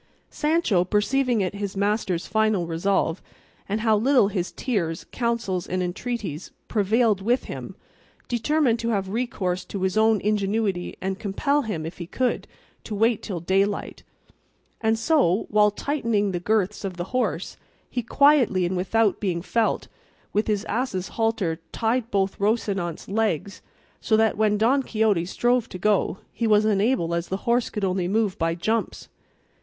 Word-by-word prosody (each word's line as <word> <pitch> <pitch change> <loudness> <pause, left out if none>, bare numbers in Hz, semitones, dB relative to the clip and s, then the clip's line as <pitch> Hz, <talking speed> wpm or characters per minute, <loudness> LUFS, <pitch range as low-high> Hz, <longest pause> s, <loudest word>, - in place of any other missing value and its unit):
Sancho 300 - +2
perceiving 235 +5 +1
it 185 -1 -1
his 200 -1 -4
master's 200 -3 0
final 215 -3 +1
resolve, 170 0 0 0.5
and 210 +2 -1
how 220 -1 +3
little 240 -1 +4
his 185 -3 -2
tears, 170 -10 -2
counsels, 235 -7 -1
and 185 0 -1
entreaties 185 - -4 0.2
prevailed 215 0 +2
with 240 +6 +1
him, - - -7 0.5
determined 245 0 +1
to 230 - -2
have 195 -4 -1
recourse 190 -5 -2
to 195 -2 -5
his 190 -1 0
own 220 -1 +4
ingenuity 205 -2 0
and 190 +1 -3
compel 280 +9 0
him, 210 - -4
if 165 +3 -7
he 175 - -6
could, 255 +6 -1 0.4
to 215 - -5
wait 225 +1 +2
till 185 -5 -4
daylight; 195 +4 0 0.8
and 220 0 +2
so, 225 - +2
while 210 0 +5
tightening 225 -4 -1
the 175 - -2
girths 210 +1 0
of 190 -3 -4
the 175 - -2
horse, 205 -9 -1 0.3
he 245 - -2
quietly 250 -7 +4
and 180 +2 -1
without 205 +3 +1
being 175 -4 -2
felt, 230 +2 0 0.5
with 210 - +1
his 210 -1 0
ass' 215 -6 -2
halter 225 -8 -1
tied 230 +1 0
both 195 -2 0
Rocinante's 200 -5 -1
legs, 200 -3 -1 0.4
so 220 - +2
that 220 0 +3
when 210 0 +2
Don 245 +6 +3
Quixote 215 -8 +1
strove 240 +5 +1
to 185 - -7
go 200 0 +1 0.2
he 230 - -1
was 210 0 +4
unable 205 -4 +1
as 170 0 -1
the 190 - -2
horse 240 0 +2
could 210 -2 -2
only 185 -1 0
move 210 0 +1
by 165 0 +1
jumps. 220 +4 -2
210 Hz, 160 wpm, -24 LUFS, 185-230 Hz, 0.8 s, while